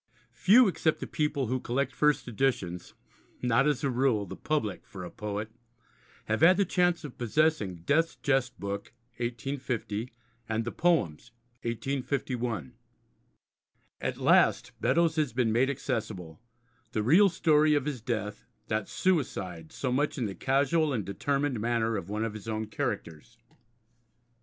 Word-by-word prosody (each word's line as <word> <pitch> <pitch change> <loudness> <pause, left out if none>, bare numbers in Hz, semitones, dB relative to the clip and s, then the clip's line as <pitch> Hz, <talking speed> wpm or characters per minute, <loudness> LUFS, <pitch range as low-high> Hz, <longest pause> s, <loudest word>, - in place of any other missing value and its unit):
Few 210 - +6
except 160 -4 +1
the - - -4
people 150 -3 -1
who 130 +3 -1
collect 130 +3 -1
first 150 -3 +2
editions 110 -8 -1 0.5
not, 125 +3 +3
as 150 -4 0
a 140 - +2
rule, 125 -5 +2
the - - -8
public 145 -10 -2
for 95 -3 -8
a 90 - -7
poet 105 +1 -4 0.7
have - - -1
had 180 +3 +7
the 200 - +3
chance 175 -1 +1
of 145 -4 -9
possessing 115 - +1
Death's 165 +3 +2
Jest 135 -3 0
Book 100 +2 -5 0.2
(1850) 120 -2 -3 0.4
and 110 +1 -1
the 120 - -2
Poems 120 - +1 0.3
(1851). 125 - -2 1.3
At - - -2
last - - +4
Beddoes 165 -1 +2
has 150 -6 +1
been 120 -2 +1
made 125 +4 +3
accessible, 110 - -4 0.5
the 110 - 0
real 180 - +6
story 155 -3 +3
of 145 -2 0
his 140 -6 -3
death, 110 -3 -4 0.2
that 110 -2 -1
suicide 95 - -1
so 130 - -2
much 145 +5 0
in 125 - -1
the 100 - -3
casual 140 - +1
and 110 -6 -2
determined 135 +5 -1
manner 115 0 0
of 95 -2 -4
one 105 +2 -1
of 110 - -4
his 110 0 -9
own 110 0 -2
characters. 110 - -4
125 Hz, 145 wpm, -29 LUFS, 110-145 Hz, 1.3 s, had